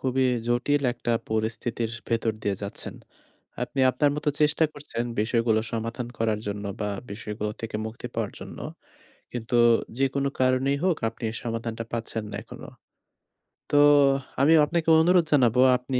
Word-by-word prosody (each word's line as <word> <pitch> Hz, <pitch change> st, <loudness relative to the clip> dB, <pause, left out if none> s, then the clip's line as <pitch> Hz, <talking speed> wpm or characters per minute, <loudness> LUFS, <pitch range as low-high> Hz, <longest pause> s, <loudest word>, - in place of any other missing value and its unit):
খুবই 130 Hz, 0 st, +1 dB, 0.2 s
জটিল 125 Hz, +4 st, +1 dB
একটা 120 Hz, -1 st, -2 dB, 0.2 s
পরিস্থিতির 110 Hz, +1 st, -1 dB, 0.2 s
ভেতর 115 Hz, -1 st, +1 dB
দিয়ে 100 Hz, -, 0 dB
যাচ্ছেন। 100 Hz, -, -5 dB, 0.7 s
আপনি 135 Hz, +2 st, -2 dB
আপনার 145 Hz, +3 st, +2 dB
মতো 150 Hz, 0 st, -1 dB
চেষ্টা 150 Hz, +2 st, +3 dB
করছেন 145 Hz, -5 st, -5 dB, 0.2 s
বিষয়গুলো 115 Hz, 0 st, +2 dB
সমাধান 115 Hz, +2 st, -3 dB
করার 110 Hz, -2 st, +1 dB
জন্য 100 Hz, 0 st, -4 dB, 0.2 s
বা 105 Hz, -1 st, -1 dB, 0.2 s
বিষয়গুলো 105 Hz, 0 st, -4 dB
থেকে 115 Hz, -1 st, -4 dB
মুক্তি 110 Hz, +1 st, -7 dB
পাওয়ার -, -, -2 dB
জন্য। -, -, -9 dB, 0.7 s
কিন্তু 120 Hz, 0 st, -1 dB, 0.4 s
যেকোনো 135 Hz, +1 st, +1 dB
কারণেই 130 Hz, +2 st, +2 dB
হোক 180 Hz, -4 st, +3 dB
আপনি 115 Hz, +1 st, -9 dB
এ -, -, -10 dB
সমাধানটা 115 Hz, 0 st, -3 dB
পাচ্ছেন 115 Hz, -1 st, -3 dB
না -, -, -5 dB
এখনো। -, -, -11 dB, 1.0 s
তো 145 Hz, -, +4 dB, 0.6 s
আমিও 155 Hz, +3 st, +6 dB
আপনাকে 165 Hz, +1 st, -1 dB
অনুরোধ 175 Hz, 0 st, +4 dB
জানাবো 125 Hz, -3 st, +4 dB, 0.2 s
আপনি 125 Hz, +1 st, -2 dB
120 Hz, 145 wpm, -26 LUFS, 110-140 Hz, 1.0 s, আমিও